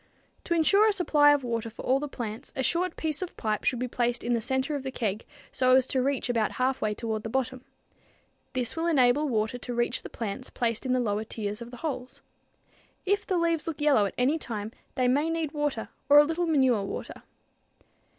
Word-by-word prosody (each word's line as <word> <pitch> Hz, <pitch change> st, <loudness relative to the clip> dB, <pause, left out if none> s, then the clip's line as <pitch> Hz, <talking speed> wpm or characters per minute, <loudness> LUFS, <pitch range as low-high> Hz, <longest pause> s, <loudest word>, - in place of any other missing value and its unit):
To 340 Hz, -, +1 dB
insure 395 Hz, +6 st, +5 dB
a -, -, +4 dB
supply 300 Hz, -6 st, +4 dB
of 290 Hz, -2 st, +2 dB
water 230 Hz, -1 st, -2 dB
for 225 Hz, -, -10 dB
all 265 Hz, +2 st, +3 dB
the 295 Hz, -, -3 dB
plants, 225 Hz, -5 st, -6 dB
a 265 Hz, -, -1 dB
short 345 Hz, +5 st, 0 dB
piece 310 Hz, -1 st, -2 dB
of 370 Hz, -, -6 dB
pipe 215 Hz, -2 st, -1 dB
should 250 Hz, -, +2 dB
be 250 Hz, +1 st, -2 dB
placed 240 Hz, 0 st, -1 dB
in 240 Hz, -, 0 dB
the 230 Hz, -, +1 dB
center 265 Hz, +5 st, -1 dB
of 285 Hz, -, -3 dB
the 265 Hz, -, -4 dB
keg 220 Hz, -5 st, -3 dB, 0.2 s
so 255 Hz, 0 st, +4 dB
as 260 Hz, -1 st, +4 dB
to 260 Hz, -1 st, 0 dB
reach 270 Hz, -1 st, 0 dB
about 230 Hz, -3 st, 0 dB
half 260 Hz, +1 st, 0 dB
way 210 Hz, -1 st, 0 dB
toward 220 Hz, -1 st, -3 dB
the 225 Hz, -, -5 dB
bottom. 260 Hz, +1 st, -2 dB, 0.9 s
This 255 Hz, 0 st, -1 dB
will 330 Hz, +1 st, -1 dB
enable 290 Hz, -1 st, +3 dB
water 220 Hz, +1 st, -1 dB
to 245 Hz, -, -5 dB
reach 240 Hz, +1 st, 0 dB
the -, -, -9 dB
plants 230 Hz, +3 st, -5 dB
placed 230 Hz, +1 st, -2 dB
in 255 Hz, -, +2 dB
the 255 Hz, -, +2 dB
lower 215 Hz, -3 st, 0 dB
tiers 210 Hz, -1 st, -4 dB
of 235 Hz, +1 st, -8 dB
holes. 255 Hz, -1 st, -5 dB, 0.8 s
If 405 Hz, +2 st, +1 dB
the 370 Hz, -, +1 dB
leaves 335 Hz, -2 st, 0 dB
look 320 Hz, -2 st, -4 dB
yellow 285 Hz, -9 st, +4 dB
at -, -, -9 dB
any 275 Hz, +6 st, +2 dB
time, 215 Hz, -5 st, -5 dB, 0.2 s
they 255 Hz, -1 st, +2 dB
may 290 Hz, +6 st, +2 dB
need 325 Hz, -3 st, -1 dB
water 295 Hz, -7 st, -2 dB, 0.2 s
or 290 Hz, -, +8 dB
a 295 Hz, -, +9 dB
little 330 Hz, +3 st, -1 dB
manure 260 Hz, -8 st, +3 dB
water. 195 Hz, -, -6 dB
255 Hz, 220 wpm, -28 LUFS, 235-295 Hz, 0.9 s, a